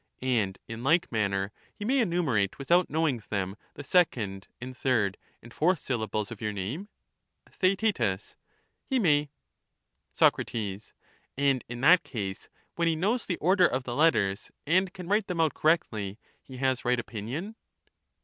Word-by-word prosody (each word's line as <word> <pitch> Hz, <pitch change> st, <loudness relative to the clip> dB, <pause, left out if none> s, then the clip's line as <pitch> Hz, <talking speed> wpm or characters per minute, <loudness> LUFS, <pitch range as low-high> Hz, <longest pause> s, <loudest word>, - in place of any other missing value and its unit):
And 110 Hz, -7 st, +1 dB
in 115 Hz, +1 st, -7 dB
like 160 Hz, +5 st, +3 dB
manner 100 Hz, -3 st, 0 dB, 0.2 s
he 205 Hz, -, -6 dB
may 265 Hz, +4 st, +2 dB
enumerate 160 Hz, -, +1 dB
without 170 Hz, +6 st, +2 dB
know 160 Hz, +2 st, +1 dB
ing 125 Hz, -6 st, -1 dB
them 100 Hz, -2 st, -2 dB, 0.2 s
the 145 Hz, -, -7 dB
second 110 Hz, -, +1 dB
and 130 Hz, +2 st, -7 dB
third 110 Hz, -8 st, +1 dB, 0.3 s
and 115 Hz, 0 st, -13 dB
fourth 180 Hz, +4 st, +2 dB
syllables 110 Hz, -6 st, -2 dB
of 115 Hz, -, -8 dB
your 105 Hz, -1 st, -1 dB
name? 110 Hz, -, -5 dB, 0.6 s
Theaet. 190 Hz, -, 0 dB, 0.5 s
He 265 Hz, -, -1 dB
may. 150 Hz, -, +3 dB, 0.8 s
Soc. -, -, +4 dB
And 115 Hz, +5 st, -3 dB
in 120 Hz, 0 st, -6 dB
that 175 Hz, +6 st, +6 dB
case, 100 Hz, -6 st, -5 dB, 0.3 s
when 170 Hz, 0 st, +1 dB
he 165 Hz, -, +2 dB
knows 210 Hz, +10 st, 0 dB
the 175 Hz, -, -1 dB
order 180 Hz, +2 st, +4 dB
of 130 Hz, +1 st, -2 dB
the 120 Hz, -1 st, -4 dB
letters 105 Hz, -11 st, +2 dB, 0.2 s
and 180 Hz, +5 st, +2 dB
can 180 Hz, -2 st, -9 dB
write 205 Hz, +1 st, +1 dB
them 180 Hz, -3 st, -3 dB
out 160 Hz, -2 st, +3 dB
correctly, 110 Hz, -, 0 dB, 0.2 s
he 130 Hz, -, -11 dB
has 130 Hz, -1 st, 0 dB
right 125 Hz, 0 st, +2 dB
opinion 120 Hz, -, -5 dB
130 Hz, 155 wpm, -28 LUFS, 105-175 Hz, 0.8 s, that